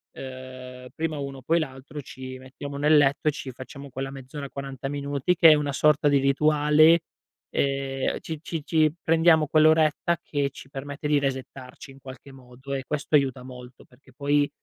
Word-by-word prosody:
ehm, 130 -1 -9
prima 160 -1 -2
uno, 140 -1 -6
poi 165 +6 +2
l'altro, 140 0 -6
ci 130 -1 -9
mettiamo 140 +2 -8
nel 150 +2 +4
letto 145 +1 +2
e - - +5
ci 140 -2 -7
facciamo 135 +2 -10
quella 135 +1 -5
mezz'ora, 135 +1 -8
40 135 -1 -6
minuti 140 +3 -1
che 165 -1 +7
è - - +9
una 145 -1 -2
sorta 150 +1 +3
di 145 -1 +4
rituale, 150 +3 +4 0.5
ehm, 135 -1 -1
ci 160 -2 -6
ci 165 -2 -5
ci 155 -2 +3
prendiamo 165 -1 +4
quell'oretta 155 +2 +3
che 140 -2 -1
ci 135 - -13
permette 140 +2 -6
di 150 -1 +3
resettarci, 135 0 -6
in 135 - -16
qualche 130 +1 -11
modo, 130 +1 -10
e 135 -1 -3
questo 150 +1 -1
aiuta 135 -3 +1
molto 125 -1 -12
perché 130 +1 -23
poi 145 +2 +1
140 Hz, 170 wpm, -25 LUFS, 130-150 Hz, 0.5 s, è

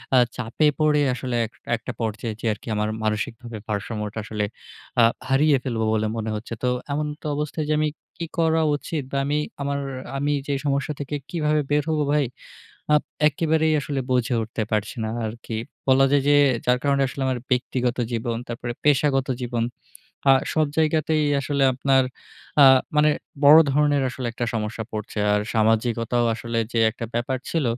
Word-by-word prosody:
আ - - +7 0.2
চাপে 125 +6 +1
পড়ে 150 -1 +3
আসলে 125 -1 -3
এক 110 - -10 0.2
একটা 115 +3 -6
পর্যায়ে 110 0 -2
যেয়ে 115 - 0
আরকি 105 - -14
আমার 105 0 0
মানসিকভাবে 115 +2 -3
ভারসাম্যটা 105 0 -3
আসলে 105 -1 -2 0.6
আ - - +7 0.3
হারিয়ে 140 +2 +4
ফেলবো 115 -4 -1
বলে 110 0 +1
মনে 110 -1 -3
হচ্ছে। 110 +2 -6
তো - - +2 0.2
এমন্ত 150 +1 -3
অবস্থায় 150 +1 -2
যে - - +3
আমি 155 0 +2 0.3
কি - - -1
করা 160 0 +3
উচিত 145 0 -4
বা 140 - -1
আমি 145 +1 0 0.2
আমা 140 0 -1 0.4
আমি 145 +2 0 0.2
যে 145 - 0
সমস্যা 140 +1 0
থেকে 145 +1 -4
কিভাবে 155 -3 +1
বের 145 0 +2
হবো 155 -1 +1
ভাই? 150 -2 +3 0.7
আপ 150 - +5 0.3
একেবারেই 155 +1 +1
আসলে 140 -1 -3
বুঝে 125 -1 +1
উঠতে 110 0 -3
পারছি 105 +3 -1
না 110 - -2 0.2
আরকি। 115 +1 -6 0.3
বলা 135 +1 +5
যায় 145 -1 +4
যে 145 - +6 0.3
যার 125 0 +3
কারণে 140 -1 +2
আসলে 135 - -6
আমার 130 -2 -1
ব্যক্তিগত 125 -1 0
জীবন, 115 0 -2
তারপরে 120 0 -4
পেশাগত 140 -2 +3
জীবন 120 -2 -1 0.7
আ - - +9 0.2
সব 155 -1 +2
জায়গাতেই 155 -1 +2 0.2
আসলে 140 0 -1
আপনার 135 +1 +3 0.6
আ - - +10 0.3
মানে 150 0 +5 0.3
বড় 150 +3 +10
ধরনের 145 0 +3
আসলে 130 0 -5
একটা 120 +1 -3
সমস্যা 110 0 -3
পড়ছে। 105 0 -5
আর 105 - +3
সামাজিকতাও 115 +2 +2
আসলে 115 0 -3
যে 115 - 0
একটা 115 +1 -7
ব্যাপার 125 +2 -1
ছিল 165 -4 0
130 Hz, 170 wpm, -23 LUFS, 115-150 Hz, 0.7 s, আ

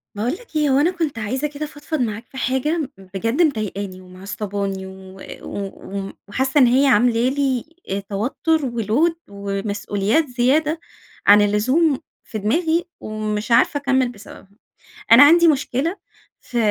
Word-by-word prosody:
باقول 220 +4 -1
لك 370 -2 -12
إيه، 300 -1 +2
هو 265 - +3
أنا 330 +5 +3
كنت 325 -9 -3
عايزة 260 +7 -2
كده 295 +1 -5
أفضفض 295 +1 -5
معاك 225 -1 -3
في 265 - -11
حاجة 270 +4 -1
بجد 195 - -2
مضايقاني 205 - -1
ومعصّباني 195 +1 -5
و 190 0 -12 0.2
وم 200 -1 -5 0.2
وم 195 0 -4
وحاسة 265 +7 +1
إن 255 - +7
هي 260 +4 +4
عاملة 240 0 +3
لي 270 -3 0 0.2
آآ 195 - -1
توتر 220 +11 -1
وload 240 - +1 0.2
ومسئوليات 200 +5 -1
زيادة 280 +6 +1 0.5
عن 205 +1 +8
اللزوم 255 +9 +2 0.2
في 220 - -6
دماغي، 320 - +1
ومش 215 +1 -4
عارفة 235 +5 +4
أكمل 265 -3 +1
بسببها. 205 -3 -13 0.6
أنا 235 +5 +10
عندي 335 +3 +7
مشكلة 300 +4 0 0.4
في 245 - -6
245 Hz, 145 wpm, -21 LUFS, 205-290 Hz, 0.6 s, أنا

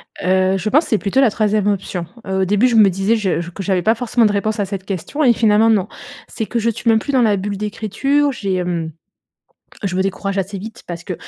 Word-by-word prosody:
Heu, 185 +1 +1
je 205 +3 -2
pense 300 +8 +3
c'est 220 - +2
plutôt 220 +7 +1
la 260 - +5
3e 210 -1 0
option. 185 -3 -2 0.2
Heu, 190 0 -1
au - - +2
début, 205 +6 +3
je 240 - 0
me 210 -3 +6
disais 195 +5 +1
je 185 -5 -1
que 195 - -7
j'avais 190 -2 +1
pas 220 - +4
forcément 235 0 +1
de 210 - +3
réponse 210 +2 -1
à 200 - +1
cette 195 -1 -6
question 195 - -3
et 245 -4 +5
finalement, 220 0 +3
non. 210 -3 +2 0.4
C'est 220 - -4
que 235 - -1
je 230 - +1
suis 230 +1 -2
même 220 -1 +4
plus 285 - -5
dans 255 - +4
la 210 -3 +3
bulle 200 +1 -4
d'écriture. 225 +8 0
J'ai, 190 -6 -2
mmh, 170 -2 -3 0.9
je 185 -2 -1
me 190 - +2
décourage 195 0 -3
assez 195 +1 -3
vite 220 +4 -9
parce 170 -1 -7
que 180 - -4
205 Hz, 245 wpm, -18 LUFS, 190-225 Hz, 0.9 s, me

